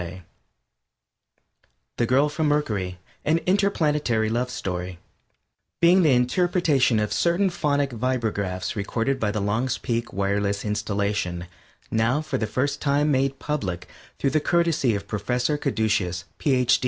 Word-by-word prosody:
] - - -47
THE 120 - +1
GIRL 135 +4 +4
FROM 155 +1 -1
MERCURY 105 -12 -1 0.3
AN 155 +2 +2
INTERPLANETARY 150 - +1
LOVE 125 +2 0
STORY 90 -5 -4 0.8
_Being 175 +2 +6
the 155 -6 +4
Interpretation 135 - +2
of 105 -1 -1
Certain 180 +3 +2
Phonic 145 -5 0
Vibragraphs 110 -7 -2
Recorded 115 +6 -1
by 105 - 0
the 105 - -2
Long's 115 +6 0
Peak 120 0 -2
Wireless 100 +1 -1
Installation, 100 -4 -1 0.5
Now 115 +5 +2
for 150 -4 -3
the 110 - -1
First 130 +6 -1
Time 145 +1 +2
Made 135 0 +1
Public 100 -14 -3 0.3
Through 135 - 0
the 155 - +3
Courtesy 165 -7 +2
of 100 0 -5
Professor 125 +7 -1
Caducious, 110 - 0 0.2
Ph. 130 -4 +3
125 Hz, 130 wpm, -24 LUFS, 105-150 Hz, 0.8 s, Being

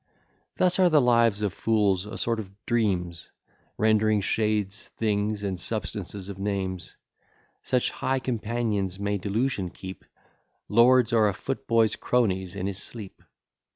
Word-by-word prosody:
Thus 185 0 +2
are 185 -1 +6
the 155 -2 +5
lives 115 -4 +3
of 100 -3 0
fools 105 -4 +1
a 110 - -7
sort 115 -1 0
of 100 -4 -6 0.2
dreams, 90 -8 -1 0.5
Rendering 110 -1 +3
shades 105 -1 -1
things, 105 -1 -1
and 95 -3 -2
substances 100 -1 -3
of 100 -1 -8
names; 95 -3 -3 0.7
Such 125 -1 0
high 135 0 -1
companions 110 -6 -2
may 100 0 -1
delusion 105 0 -1
keep, 95 +2 -9 0.6
Lords 120 +1 +5
are 110 -2 +4
a 100 - -4
footboy's 115 -2 +1
cronies 95 -7 0
in 95 -2 -3
his 100 0 -3
sleep. 105 -5 -9
105 Hz, 135 wpm, -26 LUFS, 95-115 Hz, 0.7 s, are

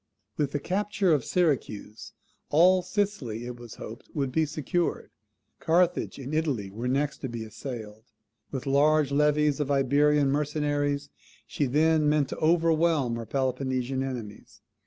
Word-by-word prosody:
With 145 -2 -1
the 145 - -1
capture 195 +1 0
of 145 -5 +1
Syracuse 130 - -1 0.4
all 180 +4 +5
Sicily, 175 - -2
it 120 0 -6
was 120 -2 -10
hoped, 115 +4 -10
would 135 -3 -1
be 160 +3 +1
secured. 155 +4 -2 0.5
Carthage 175 +2 +1
and 135 +2 -7
Italy 140 -11 -1
were 115 +5 -4
next 140 +3 0
to 130 - -4
be 115 -1 -5
assailed. 110 -1 -8 0.4
With 135 -3 -5
large 145 +1 +3
levies 150 0 +2
of 145 -2 -1
Iberian 140 +1 +3
mercenaries 145 -1 -1 0.3
she 145 - -1
then 155 +3 +3
meant 150 -2 +2
to - - -5
overwhelm 160 -5 +2
her 115 -1 -6
Peloponnesian 130 -1 -1
enemies. 120 -6 -7
145 Hz, 140 wpm, -27 LUFS, 125-155 Hz, 0.5 s, all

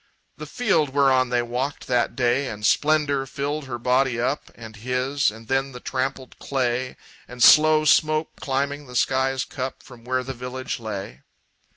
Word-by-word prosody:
The - - -8
field 160 - 0
whereon 130 -3 +3
they 120 -1 +1
walked 125 +4 -3
that 120 -2 0
day, 130 +1 +1
And 105 -3 -5
splendor 145 0 +2
filled 145 +3 -3
her 125 -2 -5
body 125 0 +1
up, 130 +5 -2
And 110 -1 -11
his; 130 +5 0
and 110 +1 -12
then 135 +1 0
the 125 - -8
trampled 130 0 -4
clay, 130 -1 -2 0.3
And 125 0 -2
slow 155 0 +7
smoke 155 +1 +2
climbing 140 +1 -2
the 125 - -11
sky's 130 +1 +1
cup 130 -3 -6
From 125 -4 -15
where 130 +1 -1
the 135 +1 -5
village 125 +1 -5
lay. 100 - -6
130 Hz, 165 wpm, -23 LUFS, 125-140 Hz, 0.3 s, slow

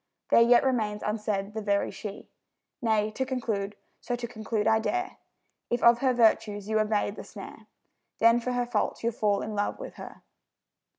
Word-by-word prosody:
There - - +7
yet 240 +1 +6
remains 220 -6 0
unsaid 210 -1 -2
the 220 - -4
very 200 -1 0
She. 205 -2 -8 0.5
Nay, 215 -2 +1
to 260 - -2
conclude 220 -6 -3 0.2
(so 245 - -3
to 240 0 -5
conclude 220 -2 -3
I 220 0 +4
dare), 365 +11 -2 0.5
If 240 - -1
of 235 0 +6
her 260 0 +2
virtues 215 -4 +2
you 220 0 +1
evade 210 -1 0
the - - -7
snare, - - -11 0.5
Then 230 +1 +5
for 250 +1 -3
her 245 0 0
faults 235 -2 -2
you'll 235 0 0
fall 210 -3 +1
in 215 - -5
love 205 0 -1
with - - -9
her. - - -10
220 Hz, 180 wpm, -28 LUFS, 210-240 Hz, 0.5 s, There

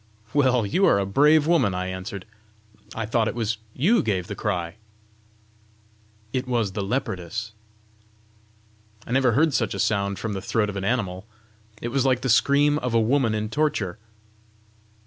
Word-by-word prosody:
"Well, 130 -5 +3
you 185 - +2
are - - +4
a 100 - 0
brave 150 +9 +4
woman!" 140 - +2
I 90 0 -2
answered. 95 +1 -6 0.7
"I 115 - -2
thought 110 0 +1
it 105 - -3
was 115 -2 -2 0.2
you 205 - +3
gave 95 -4 -1
the - - -6
cry!" 90 -3 -3 1.6
"It 130 0 -2
was 115 -5 0
the 100 - -3
leopardess." 100 -2 -3 1.5
"I - - -9
never 130 -2 +3
heard 155 +4 +3
such 115 -5 0
a - - -5
sound 100 0 0
from 105 +3 -4
the 95 - -4
throat 110 -1 0
of - - -10
an 100 - -3
animal! 100 -4 -2 0.6
it 120 - -2
was 130 +1 +1
like 130 -2 +2
the 130 - -2
scream 145 +5 +3
of 125 -4 -2
a - - +5
woman 115 0 +2
in 105 0 -2
torture!" 115 -11 -1
115 Hz, 165 wpm, -24 LUFS, 100-130 Hz, 1.6 s, a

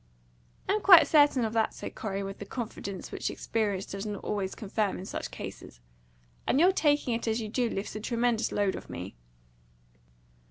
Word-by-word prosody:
"I - - +2
am 425 - 0
quite 365 -5 +9
certain 290 -5 +4
of 220 - -3
that," 225 -1 +1
said - - -7
Corey, 200 -2 -3
with 195 0 -6
that 205 - -8
confidence 200 -5 -5
which - - -2
experience 205 -4 -1
does 195 0 -6
not 210 -2 -5
always 195 -2 -2
confirm 210 -1 -1
in 185 - -7
such - - -5
cases. - - -9 0.7
"And 265 - +3
your 360 +4 +6
taking 295 -8 +2
it 230 0 -3
as 225 +1 +1
you 220 - -4
do 240 +1 0
lifts 195 0 -4
a - - -3
tremendous 235 0 0
load 200 -2 +1
off - - -9
me." 90 +3 -6
220 Hz, 190 wpm, -29 LUFS, 200-245 Hz, 0.7 s, quite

